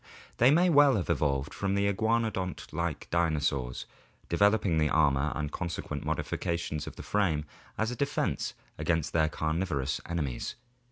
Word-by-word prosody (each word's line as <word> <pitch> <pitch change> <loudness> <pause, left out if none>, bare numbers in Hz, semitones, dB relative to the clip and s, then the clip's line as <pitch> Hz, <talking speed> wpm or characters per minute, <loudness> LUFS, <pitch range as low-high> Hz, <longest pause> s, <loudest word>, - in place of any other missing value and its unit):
They 120 - +6
may 170 +6 +5
well 145 -5 +6
have 90 -4 0
evolved 70 -3 0
from 100 0 -1
the 100 0 +2
iguanodont 110 -2 -1
like 85 -4 -2
dinosaurs, 75 -7 0 0.4
developing 100 -2 +3
the 75 -1 +2
armor 70 -2 +3
and 75 -1 -3
consequent 85 0 -4
modifications 85 -3 -2
of - - -7
the - - -8
frame 85 -8 +1 0.3
as 110 +2 0
a - - -4
defense 140 +3 -1 0.2
against 80 -1 0
their 80 -1 +3
carnivorous 80 -3 -1
enemies. 75 -8 -3
85 Hz, 145 wpm, -29 LUFS, 75-100 Hz, 0.4 s, They